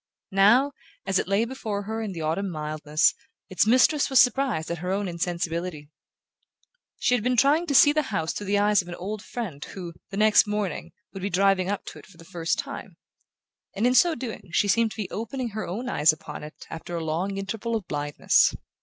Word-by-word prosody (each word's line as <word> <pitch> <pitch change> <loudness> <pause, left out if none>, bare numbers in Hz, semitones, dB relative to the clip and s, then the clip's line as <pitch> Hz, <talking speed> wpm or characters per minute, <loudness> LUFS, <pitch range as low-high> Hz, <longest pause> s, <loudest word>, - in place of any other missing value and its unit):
Now, 225 +9 +5 0.3
as 195 -1 +1
it - - -2
lay 200 +4 +2
before 220 -5 -4
her 220 +2 -4
in 215 -3 -4
the 170 -3 -6
autumn 165 +6 -1
mildness, 155 -1 0 0.4
its 185 +3 +2
mistress 260 +6 +4
was 265 -2 +5
surprised 245 -9 +2
at 170 - -3
her 180 +2 -4
own 200 +1 -1
insensibility. 170 -2 -3 1.1
She - - +1
had 240 -4 +1
been 250 0 +1
trying 295 +8 +3
to 285 - 0
see 290 +2 +7
the 305 - +2
house 165 -6 -1
through 205 - -6
the 205 +1 +2
eyes 205 0 +3
of 175 - -15
an 175 - -6
old 200 +4 -5
friend 185 -13 -6
who, 175 -3 -8 0.2
the 195 - -6
next 215 0 +5
morning, 205 -5 -3 0.2
would 195 - -7
be 200 - -2
driving 195 0 +2
up 205 - -3
to - - -9
it - - -16
for 195 -5 -19
the 165 - -14
first 165 0 -2
time; - - -7 0.8
and 210 - 0
in 250 - +4
so 335 +5 +5
doing 230 -6 -7
she 205 - +2
seemed 230 +3 +3
to - - -11
be 210 -4 -4
opening 235 +3 -4
her 215 0 -5
own 225 +8 -4
eyes 155 -10 +4
upon 155 - -8
it 150 - -11
after 170 +1 -6
a 165 - -3
long 180 +5 -2
interval 225 +4 -3
of 210 -6 -4
blindness. 145 0 +2
200 Hz, 215 wpm, -25 LUFS, 170-230 Hz, 1.1 s, see